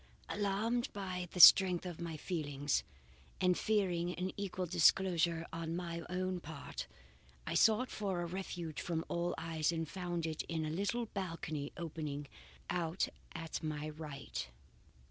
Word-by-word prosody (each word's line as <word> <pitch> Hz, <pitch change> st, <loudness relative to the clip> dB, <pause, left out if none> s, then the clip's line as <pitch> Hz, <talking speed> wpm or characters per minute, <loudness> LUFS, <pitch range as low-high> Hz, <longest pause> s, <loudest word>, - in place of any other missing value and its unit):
"Alarmed 215 Hz, +5 st, 0 dB
by 185 Hz, -3 st, -3 dB
the 180 Hz, -, -5 dB
strength 180 Hz, +1 st, +9 dB
of 175 Hz, -2 st, -6 dB
my 165 Hz, -2 st, -4 dB
feelings, 145 Hz, -4 st, -1 dB, 0.6 s
and 180 Hz, -1 st, +4 dB
fearing 180 Hz, -5 st, +1 dB
an 185 Hz, +1 st, -2 dB
equal 190 Hz, -2 st, -3 dB
disclosure 170 Hz, -1 st, +3 dB
on 165 Hz, 0 st, -3 dB
my 170 Hz, -1 st, -3 dB
own 185 Hz, 0 st, -1 dB
part, 160 Hz, -4 st, -7 dB, 0.6 s
I -, -, -2 dB
sought 225 Hz, +3 st, +4 dB
for 190 Hz, -4 st, -1 dB
a -, -, -2 dB
refuge 175 Hz, -3 st, -4 dB
from 165 Hz, -2 st, -2 dB
all 175 Hz, +1 st, 0 dB
eyes 160 Hz, -1 st, 0 dB
and 165 Hz, -1 st, -2 dB
found 175 Hz, 0 st, -3 dB
it 160 Hz, -1 st, -2 dB
in 160 Hz, -1 st, -1 dB
a 155 Hz, -, -2 dB
little 205 Hz, +7 st, 0 dB
balcony 165 Hz, -8 st, -4 dB
opening 155 Hz, -3 st, -4 dB, 0.4 s
out 170 Hz, 0 st, 0 dB, 0.3 s
at 165 Hz, -1 st, -4 dB
my 155 Hz, -1 st, -3 dB
right. 150 Hz, -, -6 dB
170 Hz, 145 wpm, -35 LUFS, 160-185 Hz, 0.6 s, strength